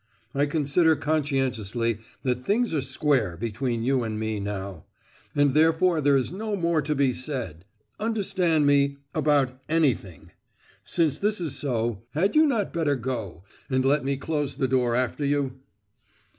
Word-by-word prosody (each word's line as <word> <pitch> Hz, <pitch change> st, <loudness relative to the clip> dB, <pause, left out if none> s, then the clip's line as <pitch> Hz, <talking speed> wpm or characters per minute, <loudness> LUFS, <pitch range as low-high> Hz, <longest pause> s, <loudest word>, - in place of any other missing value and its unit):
I 140 Hz, +1 st, +1 dB
consider 160 Hz, +2 st, +2 dB
conscientiously 130 Hz, -7 st, -1 dB, 0.2 s
that 125 Hz, -1 st, -1 dB
things 225 Hz, -, +1 dB
are 150 Hz, -, +1 dB
square 130 Hz, -, 0 dB
between 115 Hz, +2 st, -2 dB
you 130 Hz, +1 st, +2 dB
and 110 Hz, -2 st, -3 dB
me, 110 Hz, -1 st, -2 dB
now; 100 Hz, -3 st, -5 dB, 0.5 s
and 145 Hz, -2 st, +3 dB
therefore 160 Hz, +2 st, +3 dB
there 140 Hz, -1 st, +4 dB
is 130 Hz, -, -1 dB
no 210 Hz, +3 st, -3 dB
more 170 Hz, -4 st, +1 dB
to 150 Hz, +1 st, -1 dB
be 135 Hz, -2 st, +2 dB
said, 120 Hz, -, -5 dB, 0.3 s
understand 190 Hz, -8 st, +1 dB
me, 140 Hz, 0 st, +3 dB, 0.2 s
about 145 Hz, -4 st, +1 dB
anything. 140 Hz, -, 0 dB, 0.5 s
Since 155 Hz, -4 st, +1 dB
this 210 Hz, 0 st, 0 dB
is 160 Hz, -6 st, -2 dB
so, 120 Hz, -6 st, -1 dB
had 195 Hz, -, +1 dB
you 310 Hz, 0 st, +6 dB
not 230 Hz, -8 st, 0 dB
better 160 Hz, -4 st, +1 dB
go, 115 Hz, -8 st, -5 dB, 0.3 s
and 130 Hz, -1 st, +1 dB
let 140 Hz, +1 st, +3 dB
me 135 Hz, 0 st, -1 dB
close 145 Hz, -1 st, -2 dB
the 130 Hz, -, 0 dB
door 125 Hz, -2 st, +1 dB
after 125 Hz, +3 st, -1 dB
you?" 140 Hz, -2 st, -1 dB
140 Hz, 155 wpm, -25 LUFS, 125-160 Hz, 0.5 s, you